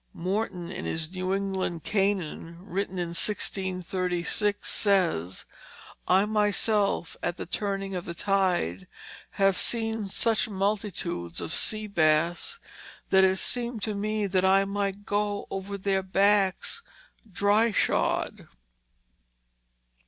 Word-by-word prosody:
Morton, 185 -1 -2
in - - -5
his 160 0 -2
New 185 0 -2
England 190 -4 -1
Canaan, 190 -5 -1
written 195 -1 -3
in 175 -1 -1
1636, 185 +1 -1
says, 175 - +1 0.6
"I 190 +2 +5
myself 210 -2 +1
at 175 - -2
the - - -5
turning 195 +1 -2
of 180 -2 -3
the 170 - -5
tyde 180 - 0 0.5
have 195 -1 +3
seen 225 -1 -1
such 225 +3 +1
multitudes 195 - -2
of 85 - -4
sea 215 0 -1
bass 170 - +1 0.5
that 190 0 +6
it 190 0 +4
seemed 235 0 -1
to 215 - 0
me 210 +1 -1
that 185 -1 +1
one 195 +1 +4
might 200 0 -2
goe 205 0 -1
over 195 +1 -4
their 195 0 +1
backs 195 - +2 0.5
dri 205 +5 +3
shod." - - 0
195 Hz, 115 wpm, -27 LUFS, 180-205 Hz, 0.6 s, that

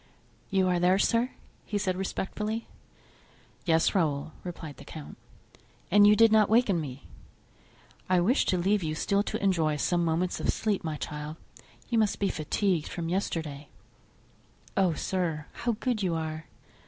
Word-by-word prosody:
"You 190 -1 +2
are 180 -1 +2
there, 180 +2 +4
sir?" 230 +4 +2 0.3
he 210 - -3
said, 190 -2 0
respectfully. 210 +4 -3 1.0
"Yes, 165 -2 +3
Raoul," 155 -6 0
replied 165 -5 -7
the - - -11
count. 155 -2 -9 0.8
"And 205 +2 +7
you 210 - +7
did 225 0 +6
not 215 -2 +5
awaken 215 -6 +3
me?" 135 -2 -7 1.0
"I 185 -1 +4
wished 225 +11 +2
to 185 - +2
leave 195 +4 +2
you 155 -2 -2
still 200 +5 +1
to 205 - -3
enjoy 165 -6 +2
some 175 +4 +1
moments 170 +2 0
of - - -1
sleep, 210 -4 0
my 155 -2 -3
child; 150 +2 -6 0.5
you 235 -2 +1
must 215 -2 +2
be 200 - 0
fatigued 165 +1 0
from 165 -1 -4
yesterday." 160 -6 -3 1.1
"Oh, 185 -4 +2
sir, 165 -5 -2
how 235 0 -1
good 245 -4 -1
you 180 -4 0
are!" 160 0 -4
180 Hz, 155 wpm, -28 LUFS, 160-205 Hz, 1.1 s, And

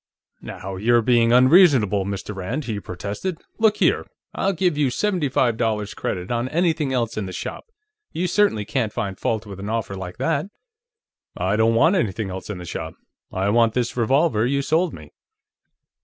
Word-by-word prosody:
"Now 95 0 -7
you're 120 +4 +3
being 115 -1 +3
unreasonable, 125 - +5
Mr. 100 +1 -4
Rand," 115 +10 -4
he 110 -4 -3
protested. 100 - -5 0.2
"Look 220 -1 +3
here; - - +2 0.3
I'll 195 - 0
give 180 -2 +1
you 145 -3 +2
seventy 175 +2 0
five 120 -3 +1
dollars' 105 -3 -1
credit 90 +2 -4
on 120 +1 -1
anything 160 -3 +1
else 115 -3 -1
in 100 -3 -2
the - - -6
shop. - - -6 0.5
You 175 - -2
certainly 180 - +2
can't 115 -3 -1
find 100 -2 -3
fault 110 -1 -1
with 100 -2 -9
an 100 +2 -5
offer 110 -3 -2
like 90 -1 -7
that." 160 +1 0 0.9
"I 95 +3 0
don't 110 +1 +3
want 160 +11 +4
anything 105 - -1
else 95 +2 -7
in 105 - -4
the 90 - -8
shop; - - -6 0.4
I 95 +2 -1
want 115 +1 +3
this 120 -2 -1
revolver 125 0 +2
you 140 +3 0
sold 160 +4 +1
me." 75 -2 -12
115 Hz, 180 wpm, -22 LUFS, 100-150 Hz, 0.9 s, unreasonable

